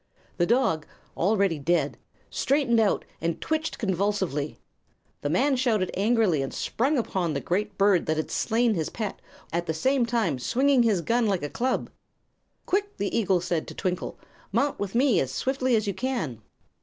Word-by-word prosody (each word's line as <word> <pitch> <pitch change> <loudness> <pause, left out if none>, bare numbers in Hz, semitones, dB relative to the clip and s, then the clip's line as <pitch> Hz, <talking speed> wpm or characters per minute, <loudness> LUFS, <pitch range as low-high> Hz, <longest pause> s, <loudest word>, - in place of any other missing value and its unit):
The 175 - +2
dog, 225 - +2 0.3
already 195 -3 +2
dead, 170 +5 +1 0.4
straightened 265 -4 +2
out 215 -3 +2 0.2
and 165 0 -1
twitched 315 0 -2
convulsively. 190 - -1 0.6
The 145 - -1
man 265 - +2
shouted 225 -7 +1
angrily 205 - +2
and 135 - -3
sprang 275 +6 0
upon 180 - -1
the 140 - -2
huge 200 +2 -1
bird 195 -3 +3
that 155 0 +1
had 155 - -2
slain 230 0 +2
his 160 -5 -1
pet, 215 -3 -4 0.3
at 170 +1 -1
the 160 - -1
same 260 +7 +2
time 220 - 0
swinging 260 - +3
his 215 -6 +2
gun 235 +5 +1
like 190 -6 0
a 145 - -3
club. 255 +1 -1 0.7
"Quick!" 400 +2 +1
said 405 - -30
the 200 - -2
eagle 195 -6 +2
to 170 -2 0
Twinkle, 180 -1 -3 0.3
"mount 285 0 +1
with 200 +1 -3
me 250 -6 +4
as 130 - -1
swiftly 260 - 0
as 215 -1 +1
you 200 - -1
can." 210 - -3
205 Hz, 170 wpm, -26 LUFS, 170-245 Hz, 0.7 s, me